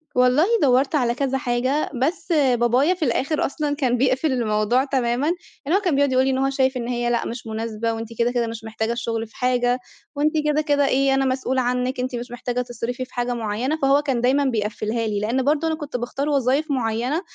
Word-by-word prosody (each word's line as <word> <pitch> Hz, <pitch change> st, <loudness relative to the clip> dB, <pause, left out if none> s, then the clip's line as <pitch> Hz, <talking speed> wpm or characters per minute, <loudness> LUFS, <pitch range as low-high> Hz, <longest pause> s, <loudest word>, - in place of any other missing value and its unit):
والله 250 Hz, +5 st, +4 dB, 0.2 s
دورت 270 Hz, +2 st, +3 dB
على 240 Hz, -4 st, +1 dB
كذا 270 Hz, 0 st, 0 dB
حاجة، 255 Hz, +4 st, 0 dB
بس 325 Hz, +6 st, -1 dB
بابايا 260 Hz, 0 st, +3 dB
في 345 Hz, -4 st, -2 dB
الآخر 275 Hz, +5 st, 0 dB
أصلًا 290 Hz, +1 st, -2 dB
كان 255 Hz, -4 st, +1 dB
بيقفل 265 Hz, +4 st, +1 dB
الموضوع 230 Hz, 0 st, +1 dB
تمامًا، 260 Hz, 0 st, 0 dB, 0.4 s
لإن 315 Hz, +6 st, +2 dB
هو -, -, +4 dB
كان 355 Hz, -8 st, +1 dB
بيقعد 280 Hz, 0 st, +2 dB
يقولي 260 Hz, +1 st, +3 dB
إن 260 Hz, -, +1 dB
هو 270 Hz, +1 st, +1 dB
شايف 265 Hz, -1 st, +1 dB
إن 235 Hz, -1 st, -4 dB
هي 240 Hz, -1 st, -1 dB
لأ، 235 Hz, -1 st, 0 dB
مش 230 Hz, -1 st, -7 dB
مُناسبة، 225 Hz, 0 st, -2 dB
وأنتِ 225 Hz, 0 st, -5 dB
كده، 235 Hz, +1 st, +2 dB
كده 240 Hz, -2 st, 0 dB
مش 225 Hz, -1 st, -7 dB
محتاجة 220 Hz, 0 st, -3 dB
الشُغل 230 Hz, -1 st, -3 dB
في 220 Hz, -, -24 dB
حاجة، 250 Hz, 0 st, +1 dB, 0.4 s
وأنتِ 295 Hz, +2 st, +2 dB
كده، 300 Hz, 0 st, +2 dB
كده 290 Hz, -2 st, +2 dB
إيه 270 Hz, 0 st, +2 dB
أنا 270 Hz, 0 st, +2 dB
مسؤول 260 Hz, 0 st, 0 dB
عنِك، 250 Hz, +1 st, -1 dB
أنتِ 250 Hz, 0 st, -2 dB
مش 240 Hz, 0 st, -6 dB
محتاجة 245 Hz, 0 st, -3 dB
تصرفي 245 Hz, +1 st, -4 dB
في -, -, -25 dB
حاجة 245 Hz, 0 st, -1 dB
مُعينة، 235 Hz, +6 st, -2 dB
فهو 275 Hz, +1 st, +4 dB
كان 270 Hz, -5 st, -1 dB
دايمًا 270 Hz, +3 st, +2 dB
بيقفلها 220 Hz, -1 st, -1 dB
لي، 210 Hz, -1 st, -1 dB
لإن 235 Hz, +5 st, 0 dB
برضه 300 Hz, +4 st, +1 dB
أنا 320 Hz, -, 0 dB
كنت 295 Hz, -4 st, -5 dB
باختار 255 Hz, +4 st, -3 dB
وظايف 280 Hz, +2 st, +1 dB
مُعينة، 250 Hz, +4 st, -1 dB
255 Hz, 210 wpm, -22 LUFS, 235-275 Hz, 0.4 s, والله